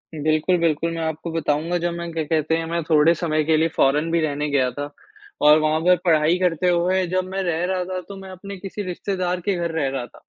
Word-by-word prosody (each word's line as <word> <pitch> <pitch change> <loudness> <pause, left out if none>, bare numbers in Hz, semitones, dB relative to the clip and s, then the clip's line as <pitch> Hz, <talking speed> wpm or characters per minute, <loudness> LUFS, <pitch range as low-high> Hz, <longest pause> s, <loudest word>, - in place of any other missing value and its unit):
बिल्कुल, 155 +4 +1
बिल्कुल, 165 0 0
मैं 165 0 -4
आपको 160 +1 -4
बताऊँगा, 165 +2 0
जब 175 0 -1
मैं, 170 0 -5
क्या 160 -1 -1
कहते 155 +1 0
हैं, 165 - -3
मैं 170 +1 -2
थोड़े 155 +1 +4
समय 155 -2 0
के 155 0 +2
लिए 160 +1 +3
फॉरेन 150 +4 +2
भी 170 - +2
रहने 150 -1 -1
गया 130 -3 +2
था, 145 0 -5 0.5
और 150 +1 +7
वहाँ 155 +1 +1
पर 180 +1 +5
पढ़ाई 160 +1 +3
करते 180 -1 +1
हुए, 180 +2 +2
जब 185 +1 -1
मैं 195 0 -2
रह 170 -1 -1
रहा 185 0 -1
था, 185 0 -4
तो 200 - -8
मैं 190 - -10
अपने 195 +1 -9
किसी 195 +2 -6
रिश्तेदार 180 -1 -2
के 200 +2 0
घर 170 -1 -2
रह 155 -4 -1
रहा 135 -2 -4
था। 120 - -18
165 Hz, 240 wpm, -22 LUFS, 155-180 Hz, 0.5 s, और